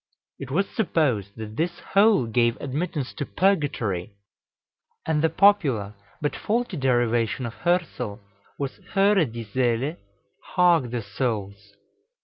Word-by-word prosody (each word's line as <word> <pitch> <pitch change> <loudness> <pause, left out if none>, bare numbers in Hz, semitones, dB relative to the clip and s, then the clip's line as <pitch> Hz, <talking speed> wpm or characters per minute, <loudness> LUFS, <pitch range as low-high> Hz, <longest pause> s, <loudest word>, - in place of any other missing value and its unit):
It 135 - -7
was 190 +8 +1
supposed 130 - 0
that 110 0 -7
this 175 +2 -1 0.2
hole 200 - +5
gave 115 +1 +1
admittance 145 0 -3
to 155 - -4
Purgatory; 135 - 0 0.9
and 155 -2 +1
the 160 - +3
popular 140 - +3 0.3
but 145 - -1
faulty 230 -2 -1
derivation 120 -3 +1
of 115 - -5
Hörsel 170 - -1 0.4
was 140 -2 -4 0.2
Höre, 195 - +4
die 115 0 -6
Seele 125 - 0 0.6
Hark, 175 -8 +4
the 120 -1 -3
Souls! 100 -3 -4
130 Hz, 125 wpm, -25 LUFS, 115-175 Hz, 0.9 s, hole